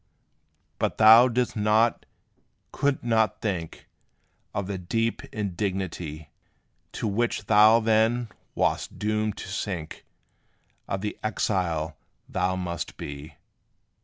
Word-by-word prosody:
But - - -1
thou 110 +3 +8
didst 125 0 -1
not, 110 +2 +2 0.6
couldst 140 -1 0
not 110 -2 +1
think 90 -7 -4 0.6
Of 100 - -3
the 95 -1 -4
deep 115 +6 -1
indignity, 90 -6 -4 0.6
To - - -3
which 110 0 -1
thou 110 +2 +6
then 115 +1 +2 0.3
wast - - -1
doomed 110 0 -1
to - - -7
sink 95 -4 -5 0.8
Of 95 - -3
the 105 0 -4
exile 85 -7 -1 0.3
thou 90 0 0
must 90 -2 -4
be. 70 +2 -8
105 Hz, 105 wpm, -26 LUFS, 90-110 Hz, 0.8 s, thou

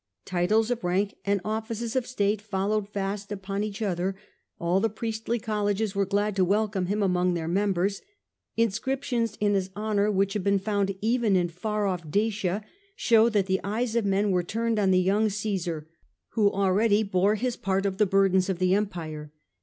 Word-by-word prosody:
Titles 210 +6 +1
of 240 -4 -2
rank 190 +3 0
and 200 0 +2
offices 225 +2 -3
of 255 -2 0
state 210 -4 0
followed 205 0 -1
fast 200 0 -4
upon 195 0 -3
each 215 +1 -4
other; 190 -1 -1 0.4
all 170 +2 +2
the 225 +3 +1
priestly 225 +2 -3
colleges 210 -2 -1
were 200 -1 0
glad 205 +1 0
to 190 - +3
welcome 200 0 +1
him 205 +2 0
among 180 -1 +2
their 165 -1 -3
members; 195 +1 0 0.6
inscriptions 230 +1 0
in 205 -1 +2
his 190 -1 0
honour 210 -1 +1
which 195 -1 +1
have 210 -3 -2
been 200 0 +3
found 200 -1 -1
even 225 -2 +2
in 175 -1 +2
far 210 +5 -2
off 180 -5 -2
Dacia 205 +1 0 0.3
show 225 -1 +4
and - - +3
popu - - -9
that 200 -3 +2
the 190 0 0
eyes 225 +3 -1
of 235 - +2
men 200 +1 +2
were 180 -1 +2
turned 225 +5 -1
on 195 -2 +2
the 185 - +4
young 195 +4 +2
lar - - +2
favour 190 -6 -2
Cacsar, - - -20 0.4
who 210 -3 +2
already 205 +3 +2
bore 200 +1 +2
his 245 +2 -1
part 195 0 -1
of 195 0 -2
the 210 - +4
bur 195 +1 +4
dens 190 +1 +2
of 190 - 0
the 185 +1 +2
empire. 160 -7 -3
200 Hz, 200 wpm, -27 LUFS, 190-215 Hz, 0.6 s, show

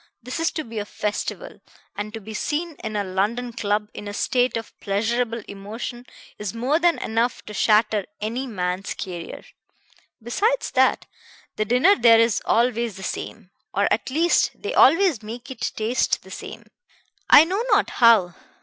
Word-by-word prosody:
This 250 +6 -5
is 330 - +2
to 315 - -3
be 230 -4 -6
a 205 - -4
festival, 210 - -4 0.3
and 205 +1 -5
to 225 - -6
be 220 +1 -9
seen 310 +9 -2
in 215 - -4
a 205 - 0
London 210 +6 -2
club 210 -2 -1
in 205 - -8
a 205 - -5
state 250 +2 +1
of 225 - -8
pleasurable 230 +3 -1
emotion 225 +5 -7 0.3
is 210 0 -4
more 260 +7 +1
than 345 0 +3
enough 230 +2 -1
to 210 - -8
shatter 215 -1 +2
any 235 +5 -3
man's 185 -3 -3
career. 175 -3 -7 0.8
Besides 410 - 0
that, - - +2 0.5
the 215 - -1
dinner 250 - +4
there 230 - +6
is 230 -1 +2
always 235 -3 +1
the 190 - -9
same, 195 0 -6 0.2
or 200 +1 +3
at 225 - -2
least 330 +6 +2
they - - -4
always 330 - +5
make 230 +4 -8
it 255 - -3
taste 225 +3 0
the - - -14
same, - - -8 0.7
I 290 - +10
know 380 +7 -1
not - - +3
how. 220 -7 +6
230 Hz, 170 wpm, -23 LUFS, 210-250 Hz, 0.8 s, I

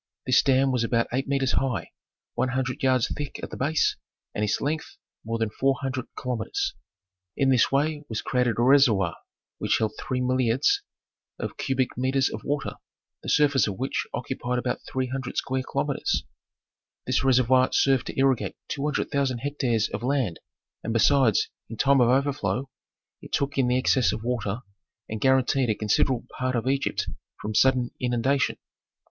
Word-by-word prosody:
This 130 0 +5
dam 135 0 +3
was 125 -2 +1
about 115 0 +1
eight 135 +1 -1
metres 135 -2 +1
high, 130 -6 -1 0.4
one - - 0
hundred 130 0 -2
yards 130 -2 +3
thick 145 -1 -5
at - - -6
the - - -5
base, 150 +4 +1 0.4
and 105 - -1
its 105 - +1
length 150 +2 -3 0.3
more 115 +1 -2
than 110 -2 -1
four 135 +4 +1
hundred 130 -2 -3
kilometres. 390 - -2 0.6
In 135 -1 +3
this 125 -3 +3
way 145 +2 +1
was 110 -1 -3
created 125 -3 +1
a 120 - +2
reservoir 120 - +4 0.4
which - - +1
held 110 -1 0
three 130 - -2
milliards 130 - +2 0.6
of - - -5
cubic 130 -3 -1
metres 130 +1 +1
of - - -6
water, 145 0 -2 0.4
the - - -6
surface 145 -4 +4
of 100 -2 -4
which 135 +5 -2
occupied 125 0 -3
about 125 0 -1
three 130 0 0
hundred 130 0 -5
square 130 -1 -1
kilometres. - - -1 0.8
This - - +1
reservoir 130 0 +4
served 135 -3 +2
to - - -6
irrigate 135 -2 +2
two 140 - -3
hundred 150 0 -1
thousand 135 -4 0
hectares 125 -7 0
of 105 - -4
land, 125 - 0 0.4
and 115 - -2
besides, 115 -1 +4 0.2
in 115 - -7
time 135 +1 +4
of 120 - +4
overflow, 135 0 0 0.5
it - - -12
took 140 0 0
in 130 -2 +2
the 125 +1 +2
excess 130 -1 +3
of 110 - -5
water 115 -2 -2 0.5
and 110 -1 -5
guaranteed 130 -1 +3
a 110 - +2
considerable 115 +4 +1
part 130 0 0
of 120 +1 -1
Egypt 135 +1 0 0.3
from 110 - -4
sudden 125 +1 +3
inundation. 125 +2 +1
130 Hz, 170 wpm, -26 LUFS, 120-135 Hz, 0.8 s, This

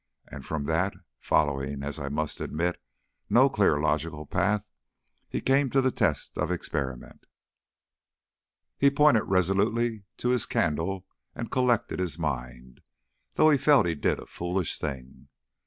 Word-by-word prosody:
And 70 -2 -9
from 80 0 -3
that, 80 +6 0 0.2
following, 70 -1 0
as 70 +2 -4
I 70 -1 -4
must 75 +1 -3
admit, 85 +3 -2 0.5
no - - +5
clear - - +3
logical 75 0 -1
path, 105 +7 0 0.6
he - - -3
came 135 +1 +2
to 135 - +2
the 130 -1 +2
test 95 - -1
of - - 0
experiment. 70 -7 -4 1.5
He 140 - +6
pointed 140 -5 +4
resolutely 100 +4 +1
to 120 - -1
his 125 -3 +1
candle 85 +4 -1 0.3
and 115 - -5
collected 125 -7 +1
his 90 -4 -2
mind, 65 -5 -5 0.5
though 155 0 +5
he 145 - +3
felt 140 -6 +5
he 85 - 0
did 75 - 0
a - - -9
foolish 90 -1 -3
thing. 65 -3 -6
85 Hz, 140 wpm, -27 LUFS, 75-115 Hz, 1.5 s, He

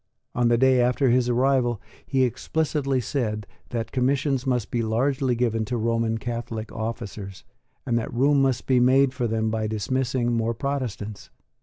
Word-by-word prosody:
On 120 -1 +2
the 120 0 +4
day 130 0 +4
after 125 +1 +2
his 125 0 +2
arrival 125 -2 +2 0.3
he 135 -2 +2
explicitly 140 +1 0
said 110 -4 -2 0.2
that 115 -1 -3
commissions 135 +1 0
must 125 -4 0
be 120 - 0
largely 125 +3 +1
given 115 -2 0
to 120 +3 -2
Roman 115 0 0
Catholic 115 -1 -5
officers, 110 -4 -6 0.4
and 120 -2 +1
that 110 - -5
room 140 +4 +3
must 135 -2 +1
be 130 -2 +3
made 130 +2 +4
for 125 -3 -1
them 110 0 0
by 110 -1 -1
dismissing 120 +2 -1
more 115 0 0
Protestants. 120 -6 -4
120 Hz, 160 wpm, -25 LUFS, 115-130 Hz, 0.4 s, the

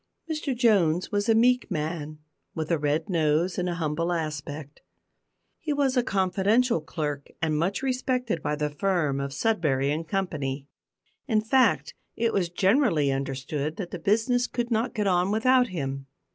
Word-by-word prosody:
Mr 305 -5 -2
Jones 185 -8 +3
was 205 +1 0
a 225 - +5
meek 250 +2 +3
man, 155 -3 -3 0.4
with 160 +1 -3
a 165 - +2
red 150 +2 0
nose 165 0 +1
and 180 0 -1
a 175 - -2
humble 165 +1 -1
aspect. 150 -3 -4 0.8
He 305 -2 -2
was 280 -2 +1
a 250 - +4
confidential 200 +2 +1
clerk, 150 -2 -4
and 160 -1 0
much 180 - -1
respected 250 - -1
by 150 - -1
the 150 0 -2
firm 155 -4 0
of 140 0 -2
Sudberry 140 -5 +1
and 160 +2 -3
Company. 150 -7 -2 0.6
In 220 -5 +3
fact, 215 - +2 0.2
it 230 0 0
was 180 -4 +1
generally 185 - +2
understood 135 +3 -3
that 180 -2 -6
the 180 - -5
business 230 +7 +2
could 240 0 -3
not 230 +2 0
get 210 -2 0
on 180 -1 +2
without 250 +4 +3
him. 135 - -4
175 Hz, 160 wpm, -26 LUFS, 150-225 Hz, 0.8 s, a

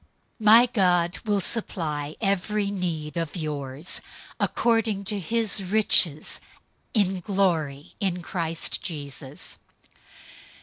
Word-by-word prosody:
004:019 220 - -7
My 230 +3 +9
God 180 -6 +1
will 205 -2 +1
supply 155 -8 -2
every 200 0 0
need 170 -5 -3
of 165 0 -3
yours 150 -1 -4 0.4
according 225 -4 +1
to 205 +1 -1
his 215 +1 +2
riches 185 -6 +4 0.6
in 195 -3 +2
glory 165 -7 -1
in 180 -3 -1
Christ 165 -2 -2
Jesus. 145 -3 -6
180 Hz, 100 wpm, -25 LUFS, 155-205 Hz, 0.6 s, My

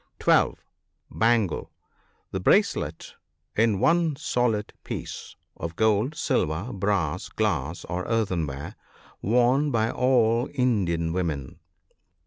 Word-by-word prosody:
(12.) - - +3 0.5
Bangle. 115 -6 +1 0.3
— - - -41
The - - -2
bracelet, - - +1 0.4
in 110 -3 +2
one 165 - +3
solid 120 -5 -1
piece, - - -6 0.2
of 85 0 -6
gold, 110 - +2
silver, 90 - -1
brass, 95 -5 -1
glass, 85 -7 -1
or 90 +1 -3
earthenware, 85 - -2 0.5
worn 125 +7 +3
by 115 -2 +1
all 120 -1 +2
Indian 90 - +1
women. 80 -6 -3
105 Hz, 105 wpm, -26 LUFS, 85-120 Hz, 0.5 s, 12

